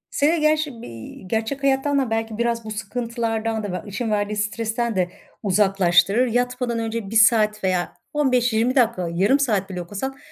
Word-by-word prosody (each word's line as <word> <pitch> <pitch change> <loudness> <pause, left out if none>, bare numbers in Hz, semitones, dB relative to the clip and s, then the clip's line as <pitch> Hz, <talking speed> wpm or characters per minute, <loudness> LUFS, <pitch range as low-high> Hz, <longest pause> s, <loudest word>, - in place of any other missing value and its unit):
Seni 310 +3 +2
gerçi 305 -5 +1
bir 115 -2 -10
gerçek 225 +6 -2
hayattan 275 +1 +2
da 260 -4 0
belki 225 -1 -2
biraz 235 -1 0
bu 215 - -6
sıkıntılardan 225 0 -2
da 205 -3 -4
ve 180 - -5
işin 215 +3 -3
verdiği 210 0 -1
stresten 220 +1 -2
de 180 -1 +1 0.3
uzaklaştırır. 195 +2 +3
Yatmadan 245 0 -1
önce 225 -2 -3
1 225 - -4
saat 215 -2 +4
veya 185 -2 0 0.2
15-20 250 -4 +2
dakika, 225 -8 +2
yarım 200 +11 +3
saat 205 -8 0
bile 180 -1 -4
okusan 210 +10 -5
225 Hz, 165 wpm, -22 LUFS, 205-250 Hz, 0.3 s, saat